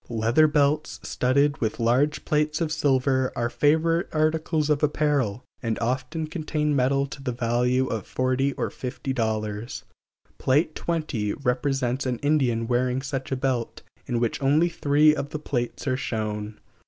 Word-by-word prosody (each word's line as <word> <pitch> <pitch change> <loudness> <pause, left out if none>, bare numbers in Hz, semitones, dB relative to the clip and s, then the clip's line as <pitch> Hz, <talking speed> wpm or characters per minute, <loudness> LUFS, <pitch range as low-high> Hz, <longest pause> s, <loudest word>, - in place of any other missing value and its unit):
Leather 115 +7 +3
belts 150 0 +1
studded 140 +3 +1
with 110 -2 -1
large 125 +6 +1
plates 150 0 +1
of 165 -2 -1
silver 130 -3 +1
are 120 -1 -1
favorite 160 +7 +2
articles 155 0 +1
of 145 - +2
apparel, 145 -7 +1 0.2
and 115 -2 -1
often 130 +7 -2
contain 155 -2 -1
metal 135 +1 +2
to 140 0 -9
the 130 -2 -2
value 125 +2 +1
of 110 -6 -4
forty 130 +2 0
or - - -3
fifty 130 +1 -4
dollars. 110 -2 -2 0.6
Pl. 130 - +2
XX 155 - -3
represents 130 +1 0
an 125 -1 -1
Indian 130 -6 +2
wearing 125 +2 0
such 135 -1 -4
a - - +1
belt, 130 -3 -2 0.2
in 120 - 0
which 120 +2 -1
only 150 +5 +3
three 150 -1 +4
of 145 -2 -3
the 150 - -4
plates 120 -5 -3
are 130 -2 0
shown. 105 -3 -4
135 Hz, 155 wpm, -25 LUFS, 120-150 Hz, 0.6 s, three